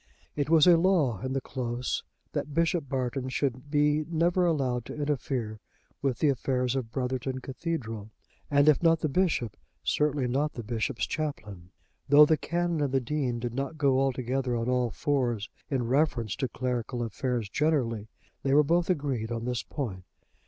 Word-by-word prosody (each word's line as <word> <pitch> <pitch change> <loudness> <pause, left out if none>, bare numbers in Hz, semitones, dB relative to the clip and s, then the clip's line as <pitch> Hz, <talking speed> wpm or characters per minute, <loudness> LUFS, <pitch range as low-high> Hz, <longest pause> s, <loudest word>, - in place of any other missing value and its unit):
It 145 0 -1
was 160 -2 +6
a 175 -2 +7
law 165 - +2
in 130 0 -3
the 135 - +1
Close 125 -1 -3 0.3
that 145 0 -3
Bishop 165 -3 +1
Barton 130 -1 -2
should 130 0 -2
be 150 +1 +2
never 175 +2 +2
allowed 130 -7 0
to - - -7
interfere 130 -7 -2 0.4
with 135 -4 0
the 150 - +3
affairs 125 -1 0
of 130 -4 -2
Brotherton 130 0 -2
Cathedral; 125 -6 -4 0.4
and 145 0 +4
if 150 - +5
not 165 -1 +4
the - - +1
bishop, 150 - 0 0.3
certainly 145 -3 +1
not 145 +4 0
the 120 - -6
bishop's 115 +3 -1
chaplain. 105 - -5 0.4
Though 145 +2 +9
the 155 - +4
Canon 170 +1 -1
and 140 -2 0
the 135 - +3
Dean 130 -1 -1
did 120 0 -4
not 140 +4 -3
go 140 -3 +3
altogether 130 -1 0
on 115 +1 -2
all 125 -1 +1
fours 120 -5 -1 0.2
in 130 -5 0
reference 130 -5 +1
to 135 -1 0
clerical 125 -1 -2
affairs 120 0 -2
generally 115 -5 0 0.3
they 135 0 +2
were 150 - +7
both 170 +4 +1
agreed 135 -9 -1
on 115 0 -3
this 125 -2 -1
point. 105 -7 -5
135 Hz, 170 wpm, -28 LUFS, 120-150 Hz, 0.4 s, Though